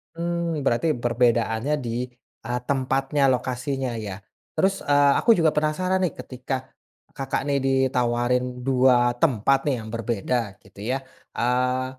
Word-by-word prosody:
Mmm, 170 -1 -2
berarti 120 +7 +2 0.2
perbedaannya 120 +2 +1
di, 120 -1 -3 0.4
eee, 120 +1 -2
tempatnya, 135 +1 0
lokasinya 130 0 -2
ya. 105 -3 -5 0.4
Terus, 195 0 +1
eee, 145 -1 +4
aku 235 - +4
juga 160 -2 +4
penasaran 185 +5 +1
nih 175 - +1
ketika 130 +1 -4 0.6
Kakak 135 -2 -3
nih 140 -1 +1
ditawarin 125 -2 +1 0.2
2 125 -2 +4
tempat 135 0 +2
nih 125 -5 0
yang 110 - -9
berbeda 115 -2 -2
gitu 95 0 -17
ya, 135 - +1 0.4
eee, 125 +1 +1
130 Hz, 130 wpm, -24 LUFS, 120-145 Hz, 0.6 s, eee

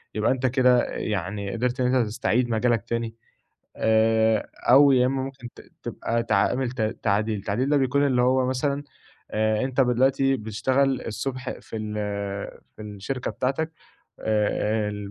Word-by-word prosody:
يبقى 105 - +2
أنت 130 0 -1
كده 125 -1 +4
يعني 100 0 -3
قدرت 125 +2 -1
إن 125 - +2
أنت 125 -3 +3
تستعيد 120 +2 0
مجالك 115 -1 +1
تاني 115 -1 -2 0.6
آآ، 110 0 +2 0.2
أو 140 +2 +7
يا 125 -1 +4
إمّا 135 +1 -1
ممكن 130 -2 -7
ت - - -11 0.2
تبقى 115 0 -2
تعامل 120 +3 +1
ت 125 -1 -7 0.2
تعديل، 105 0 0
تعديل 110 +7 -1
ده 150 - +4
بيكون 140 +1 +2
اللي 125 -3 +2
هو 130 +1 +3
مثلًا 140 +2 -1 0.5
آآ، 110 +1 +1
أنت 130 0 0
دلوقتي 135 +2 +2
بتشتغل 130 +4 0
الصبح 125 +3 -4
في 120 -1 -9
ال 110 -1 -4 0.8
في - - -9
الشركة 105 +5 -4
بتاعتك 140 +5 -2 0.5
آآ، 105 -1 0
120 Hz, 145 wpm, -25 LUFS, 110-130 Hz, 0.8 s, أو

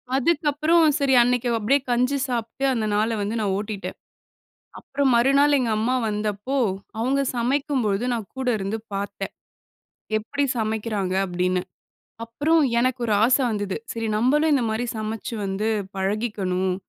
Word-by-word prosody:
அதுக்கப்புறம், 310 +3 +3
சரி 275 -2 +2
அன்னைக்கு 245 0 +1
அப்டியே 235 +6 +2
கஞ்சி 250 +3 +2
சாப்ட்டு, 235 +1 -3
அந்த 225 -3 -1
நாளை 220 +2 +1
வந்து 205 +3 -2
நான் 200 -2 0
ஓட்டிட்டேன். 205 -1 -5 0.8
அப்புறம் 280 -1 0
மறுநாள் 275 +4 +4
எங்க 245 -3 0
அம்மா 235 +4 +1
வந்தப்போ, 210 +4 -2 0.4
அவுங்க 265 +4 +1
சமைக்கும் 265 +3 0
பொழுது 205 +2 0
நான் 225 -5 -3
கூட 260 -1 -2
இருந்து 200 +3 -3 0.2
பாத்தேன். 200 0 -4 0.9
எப்படி 280 +7 -2
சமைக்கிறாங்க? 215 -3 -1
அப்டின்னு. 180 0 0 0.6
அப்புறம் 290 +8 +1 0.2
எனக்கு 255 +1 +1
ஒரு 220 - 0
ஆசை 260 +3 +4
வந்தது, 205 -3 -2 0.2
சரி 225 -1 -3
நம்பளும் 295 +8 +3
இந்த 260 -4 +1
மாரி 225 +3 -1
சமைச்சு 220 +2 -4
வந்து 195 +3 -1 0.3
பழகிக்கணும். 190 -2 -1
230 Hz, 135 wpm, -23 LUFS, 210-265 Hz, 0.9 s, மறுநாள்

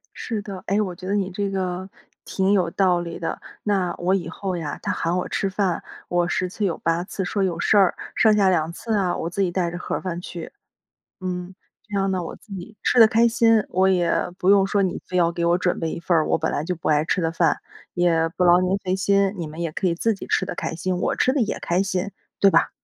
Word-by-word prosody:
是 220 -3 -4
的， 195 -3 -8
哎， 200 +2 +2
我 185 -4 -3
觉 185 +1 -9
得 200 - 0
你 195 -2 0
这 200 +2 -2
个， 185 -1 -3 0.3
挺 190 0 0
有 180 -4 +2
道 180 0 +2
理 170 -1 -6
的。 165 - -4 0.2
那 190 -4 0
我 180 +2 +1
以 170 -4 -3
后 185 +1 -4
呀， 160 -4 -4
他 - - -1
喊 170 +2 -1
我 - - -2
吃 195 - -1
饭 190 -3 -1 0.2
我 175 -1 +1
10 185 +1 0
次 205 +2 -2
有 175 - -1
8 165 +1 0
次 190 0 -4
说 195 +3 -1
有 175 -3 -1
事 210 - +3
儿， 195 -3 +4 0.2
剩 220 -2 +5
下 195 -2 +4
2 165 -3 +1
次 225 +6 -4
啊， 185 -4 +1
我 165 - -3
自 190 +3 -2
己 185 -2 +1
带 175 -1 -1
着 175 - -5
盒 - - -3
饭 175 -2 -4
去。 170 -2 -8 0.7
嗯。 180 0 -4 0.4
这 - - +1
样 195 - +1
呢， 185 -2 -1
我 - - -6
自 210 - -13
己 195 +3 -9
吃 245 - +5
得 225 - +9
开 230 +2 +4
心， 225 -1 +3
我 190 +1 +2
也 175 -2 +2 0.3
不 185 - +2
用 200 -1 +6
说 200 +1 +1
你 185 -2 -1
非 180 - -2
要 170 -1 +4
给 170 - -2
我 170 +1 +3
准 180 -1 0
备 165 -1 -2
一 - - -5
份 170 +1 +1
儿 155 - +2
我 - - +2
本 - - -1
来 145 - -2
就 180 - -2
不 170 - -5
爱 150 -1 +3
吃 160 - 0
的 165 -2 -1
饭， - - +2 0.4
也 165 -2 +2
不 180 +2 0
劳 175 +1 +6
您 185 +2 +1
费 185 -1 -2
心。 195 0 +2
你 170 - -3
们 155 +1 -9
也 165 -2 -3
可 185 - 0
以 170 - +2
自 225 +6 +1
己 195 - -8
吃 190 - +1
得 - - -5
开 - - -3
心， 180 +3 -2
我 - - 0
吃 255 - +3
得 280 - +1
也 215 - -1
开 180 +3 0
心， 190 0 -2 0.3
对 200 - +6
吧？ - - +3
185 Hz, 275 characters per minute, -23 LUFS, 175-195 Hz, 0.7 s, 得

